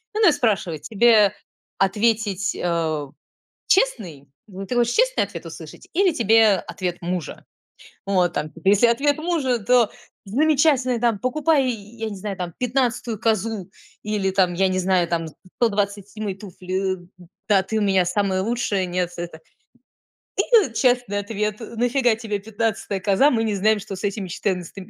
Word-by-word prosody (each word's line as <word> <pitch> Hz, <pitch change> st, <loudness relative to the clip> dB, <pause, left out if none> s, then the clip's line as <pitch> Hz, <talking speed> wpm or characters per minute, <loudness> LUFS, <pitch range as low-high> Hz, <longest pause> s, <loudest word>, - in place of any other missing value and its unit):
Ну 430 Hz, -3 st, +4 dB
и -, -, +5 dB
спрашивает: 195 Hz, -, -1 dB
"Тебе 215 Hz, -2 st, +4 dB, 0.4 s
ответить, 205 Hz, 0 st, +1 dB
э 165 Hz, -4 st, -1 dB, 0.6 s
честный? 195 Hz, -, +1 dB, 0.4 s
Ты 250 Hz, -, -2 dB
хочешь 240 Hz, 0 st, +2 dB
честный -, -, +2 dB
ответ -, -, -9 dB
услышать, -, -, -11 dB
или 380 Hz, 0 st, +3 dB
тебе 225 Hz, -5 st, +4 dB
ответ 180 Hz, -2 st, -3 dB
мужа?" 175 Hz, -3 st, -4 dB, 0.6 s
Вот 180 Hz, -3 st, +2 dB
там, 150 Hz, -1 st, -3 dB
если 205 Hz, +4 st, +5 dB
ответ 285 Hz, +5 st, +1 dB
мужа, 310 Hz, -8 st, 0 dB
то: 240 Hz, +1 st, +3 dB, 0.3 s
"Замечательный", 270 Hz, +1 st, +2 dB
там, 230 Hz, -4 st, +1 dB
"Покупай", 290 Hz, +3 st, +2 dB
я 225 Hz, 0 st, -6 dB
не 200 Hz, -, -6 dB
знаю, 195 Hz, 0 st, -5 dB
там: 175 Hz, -2 st, -5 dB
"15 245 Hz, -3 st, -1 dB
козу" 220 Hz, -3 st, -1 dB, 0.3 s
или, 205 Hz, -2 st, -1 dB
там, 185 Hz, -2 st, +2 dB
я 190 Hz, +2 st, +2 dB
не 185 Hz, 0 st, 0 dB
знаю, 185 Hz, -1 st, +2 dB
там: 165 Hz, -1 st, -2 dB
"127 200 Hz, +2 st, -3 dB
туфли", 185 Hz, -1 st, -4 dB
э. 180 Hz, 0 st, -19 dB, 0.2 s
"Да, 195 Hz, -2 st, +4 dB
ты 220 Hz, +4 st, -4 dB
у -, -, 0 dB
меня 190 Hz, -3 st, +2 dB
самая 190 Hz, 0 st, 0 dB
лучшая, 205 Hz, -4 st, -1 dB
нет, 180 Hz, 0 st, -1 dB
это" 170 Hz, -2 st, -6 dB, 1.0 s
И 420 Hz, -, +3 dB
честный 245 Hz, -4 st, +1 dB
ответ: 210 Hz, 0 st, -3 dB
"На 235 Hz, +1 st, -2 dB
фига 245 Hz, -3 st, +2 dB
тебе 215 Hz, -2 st, -4 dB
15 205 Hz, -2 st, -3 dB
коза? 200 Hz, +9 st, +4 dB
Мы 225 Hz, -2 st, +1 dB
не 215 Hz, -2 st, -1 dB
знаем, 215 Hz, +2 st, +2 dB
что 200 Hz, -1 st, -7 dB
с -, -, -9 dB
этими 195 Hz, -2 st, -3 dB
четырнадцат 180 Hz, -1 st, -3 dB
210 Hz, 150 wpm, -22 LUFS, 185-235 Hz, 1.0 s, и